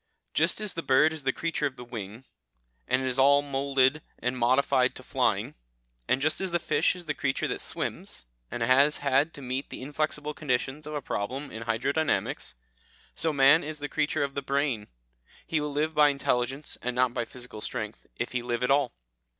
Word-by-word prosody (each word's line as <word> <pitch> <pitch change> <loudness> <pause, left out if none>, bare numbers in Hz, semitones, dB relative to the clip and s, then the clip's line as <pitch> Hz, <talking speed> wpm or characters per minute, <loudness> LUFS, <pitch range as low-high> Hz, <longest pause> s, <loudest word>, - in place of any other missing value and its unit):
"Just - - +2
as 210 -2 -2
the 165 - -3
bird 150 +3 +4
is 155 -4 -5
the 135 - +3
creature 165 0 -1
of 130 - -8
the 125 - -9
wing, 115 0 -7 0.6
and 130 +1 +2
is 130 0 0
all 140 +2 +6
moulded 140 0 +2 0.2
and 125 +1 -2
modified 130 +1 +3
to - - -10
flying, - - 0 0.5
and 130 - +2
just 155 +5 +1
as 190 - -1
the 175 - +3
fish 175 - +1
is 180 -1 -9
the 150 - -1
creature 135 -2 -1
that - - -3
swims, - - -4 0.2
and 120 - -3
has 135 +5 +5
had 140 +3 +3
to 140 - -9
meet 130 +2 -3
the - - -7
inflexible 150 +1 -2
conditions 140 +1 -2
of 150 - -5
a 145 - -3
problem 130 +9 -3
in 115 +1 -7
hydrodynamics, 135 - 0 0.6
so 160 0 +1
man 140 +3 +6
is 155 +1 -4
the 145 0 -4
creature 150 +1 0
of 140 -1 -3
the 140 - -2
brain; 140 -6 -1 0.6
he 160 -2 0
will 150 0 -2
live 155 +2 0
by 150 -1 +6
intelligence, 135 0 -1
and 125 +1 -2
not 125 -1 +2
by 120 - -1
physical 125 -2 -9
strength, 110 0 -5
if 120 - -2
he 125 - -1
live 120 0 -2
at 125 - +2
all. 140 -3 +3
135 Hz, 200 wpm, -28 LUFS, 125-150 Hz, 0.6 s, all